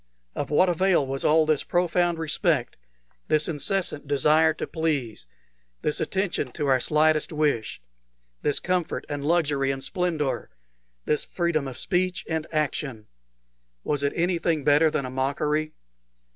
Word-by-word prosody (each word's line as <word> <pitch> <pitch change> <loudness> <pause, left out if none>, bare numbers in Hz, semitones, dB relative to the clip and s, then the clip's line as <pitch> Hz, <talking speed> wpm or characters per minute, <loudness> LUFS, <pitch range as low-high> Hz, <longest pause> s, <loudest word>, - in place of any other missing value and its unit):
Of 145 - -4
what 150 +6 +4
avail 175 -3 +2
was 135 0 -4
all 155 +1 +4
this 155 -2 +1
profound 175 0 +1
respect, 160 -2 0 0.5
this 155 0 +2
incessant 165 -1 -1
desire 150 +3 +4
to - - -4
please, 150 -9 -2 0.6
this 150 - 0
attention 190 -9 -1
to 150 - -2
our 135 -2 +3
slightest 155 +4 +2
wish, 150 -8 0 0.6
this 145 - +1
comfort 180 -2 -1
and 145 -1 -4
luxury 145 -4 +1
and 135 0 -3
splendor, 165 -6 -2 0.6
this 150 - +1
freedom 170 -5 -1
of 130 -2 -7
speech 180 +3 -1
and 160 -1 -2
action? 145 -7 -2 0.7
Was 145 -2 -1
it 140 0 0
anything 170 -3 0
better 150 +2 +5
than 140 -3 -2
a 130 - -6
mockery? 150 +4 -1
155 Hz, 140 wpm, -25 LUFS, 140-170 Hz, 0.7 s, better